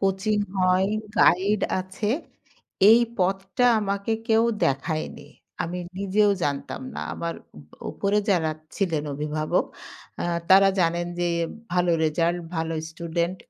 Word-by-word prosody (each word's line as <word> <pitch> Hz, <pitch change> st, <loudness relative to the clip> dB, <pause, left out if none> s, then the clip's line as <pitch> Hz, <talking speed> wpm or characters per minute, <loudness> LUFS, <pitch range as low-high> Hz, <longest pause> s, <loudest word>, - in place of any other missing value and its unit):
Coaching 195 Hz, +2 st, +1 dB, 0.2 s
হয়, 185 Hz, +1 st, +3 dB, 0.3 s
guide 195 Hz, +3 st, +4 dB, 0.2 s
আছে। 190 Hz, +3 st, -3 dB, 0.8 s
এই 230 Hz, -, +7 dB, 0.2 s
পথটা 195 Hz, +5 st, +1 dB
আমাকে 200 Hz, +2 st, -1 dB, 0.2 s
কেউ 225 Hz, +1 st, +4 dB, 0.2 s
দেখায়নি। 155 Hz, +4 st, -2 dB, 0.3 s
আমি 175 Hz, +2 st, -4 dB, 0.2 s
নিজেও 200 Hz, +1 st, +3 dB
জানতাম 140 Hz, -, -3 dB
না। -, -, -4 dB
আমার 170 Hz, 0 st, -3 dB, 0.2 s
উপ 75 Hz, -, -14 dB, 0.3 s
উপরে 200 Hz, +1 st, +1 dB
যারা 160 Hz, -4 st, +2 dB, 0.3 s
ছিলেন 165 Hz, -7 st, 0 dB
অভিভাবক 150 Hz, +1 st, -1 dB, 0.6 s
আ -, -, -2 dB, 0.3 s
তারা 195 Hz, +1 st, +8 dB
জানেন 170 Hz, +1 st, +1 dB
যে 175 Hz, -, +1 dB, 0.4 s
ভালো 180 Hz, -1 st, +2 dB
রেজাল্ট, 170 Hz, +3 st, +1 dB, 0.2 s
ভালো 160 Hz, 0 st, -1 dB, 0.2 s
স্টুডেন্ট। 170 Hz, +2 st, -2 dB
180 Hz, 120 wpm, -25 LUFS, 165-195 Hz, 0.8 s, তারা